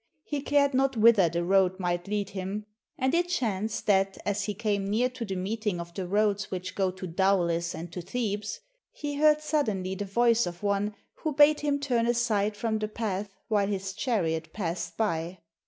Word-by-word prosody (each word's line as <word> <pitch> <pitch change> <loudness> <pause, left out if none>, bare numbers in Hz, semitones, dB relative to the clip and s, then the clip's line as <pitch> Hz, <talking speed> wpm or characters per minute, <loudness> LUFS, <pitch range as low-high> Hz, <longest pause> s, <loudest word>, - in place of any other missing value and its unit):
He 290 -2 -3
cared 280 0 +2
not 265 -1 +2
whither 215 -5 +6
the 170 +1 -1
road 190 0 +3
might 175 0 -1
lead 205 -1 -2
him, 195 +2 -4 0.3
and 260 +2 +1
it 350 +1 +2
chanced 225 - -1
that 195 -1 +2
as 205 0 0
he 210 - -3
came 205 -2 -1
near 235 +5 +2
to 255 -1 -6
the 195 -4 -4
meeting 205 0 -2
of 170 0 -7
the 185 -1 -4
roads 205 +1 +1
which 185 -1 -4
go 190 -2 +1
to 185 0 -7
Daulis 170 -2 +1
and 170 +1 -7
to 180 - -4
Thebes, 210 - -3 0.3
he 290 -1 -5
heard 305 0 +5
suddenly 220 -12 0
the 200 +2 -4
voice 235 +2 +3
of 175 +2 -7
one 205 +1 0 0.2
who 310 -3 -3
bade 295 +1 +6
him 290 -1 0
turn 245 -5 +1
aside 215 -3 +1
from 220 0 -1
the 215 - -1
path 210 -2 -3 0.2
while 205 -3 +2
his 195 -1 -3
chariot 165 -9 -1
passed 170 -3 -3
by. 175 -4 -1
205 Hz, 190 wpm, -28 LUFS, 185-235 Hz, 0.3 s, whither